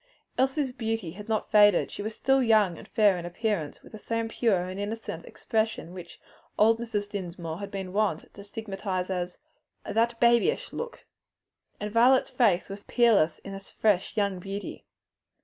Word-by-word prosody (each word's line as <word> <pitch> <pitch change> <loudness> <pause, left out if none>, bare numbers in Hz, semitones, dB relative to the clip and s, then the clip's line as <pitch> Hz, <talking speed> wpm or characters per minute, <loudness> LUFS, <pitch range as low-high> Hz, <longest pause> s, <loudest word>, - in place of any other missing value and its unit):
Elsie's 265 +1 +1
beauty 225 -7 -3
had 210 +5 -10
not 220 -1 -1
faded, 205 -3 +5
she - - -6
was 215 +1 -4
still 270 0 +3
young 215 -7 +4
and - - -12
fair 205 -4 +3
in 170 - -6
appearance, 180 -4 -2
with - - -15
the 215 - -9
same 230 +1 -2
sweetly - - -13
pure 205 -7 +3
and 185 +2 -6
innocent 205 -5 -5
expression 220 -6 -2
which 175 -2 -10 0.4
old 225 +2 +5
Mrs. 215 -3 -3
Dinsmore 175 -4 -5
had 200 0 -5
been 190 -2 -5
wont 205 -6 -1
to 200 - -11
stigmatize 195 -3 -4
as 180 -1 -3 0.5
"that 230 +1 0
babyish 240 - +3
look." 480 0 -6 0.7
And 210 0 -4
Violet's 245 +4 +4
face 200 -8 +2
was 200 +1 -8
peerless 220 -10 +3
in 195 - -6
its 195 0 -9
fresh 205 -1 +1
young 200 -3 +1
beauty. 195 +2 -6
205 Hz, 170 wpm, -27 LUFS, 185-225 Hz, 0.7 s, faded